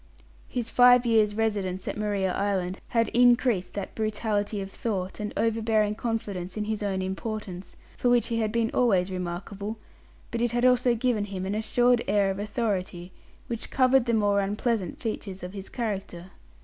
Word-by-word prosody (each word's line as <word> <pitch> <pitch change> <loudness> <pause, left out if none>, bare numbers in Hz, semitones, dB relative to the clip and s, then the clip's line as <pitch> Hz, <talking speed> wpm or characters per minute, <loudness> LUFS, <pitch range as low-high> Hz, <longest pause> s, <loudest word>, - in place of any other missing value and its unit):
His 235 -2 -3
five 245 0 +6
years' 215 -3 +3
residence 200 -4 -1
at - - -2
Maria 205 -3 -1
Island 190 -2 -1
had 230 -1 +1
increased 240 -6 +3
that 200 -2 -4
brutality 215 -1 -1
of 195 0 -6
thought, 195 -4 -3
and 210 0 -3
overbearing 220 -1 +1
confidence 210 -5 -4
in 210 - -1
his 215 0 -3
own 195 -2 -1
importance, 190 -1 -5 0.2
for 245 - +1
which 245 -1 +3
he 230 -1 0
had 215 -1 0
been 230 0 0
always 195 -7 +2
remarkable, 190 +4 -5 0.5
but 235 - -2
it 240 -1 +1
had 240 +1 +2
also 250 -1 +4
given 230 -3 0
him 190 -2 -5
an 195 - -2
assured 240 +3 +2
air 200 -2 +3
of 190 - -5
authority, 195 -4 -2 0.3
which 230 -2 -5
covered 255 -1 +4
the 235 - +2
more 205 -2 +3
unpleasant 205 -1 -1
features 200 -5 -5
of 180 +1 -6
his 195 -1 -7
character. 195 -6 -4
210 Hz, 170 wpm, -27 LUFS, 195-230 Hz, 0.5 s, five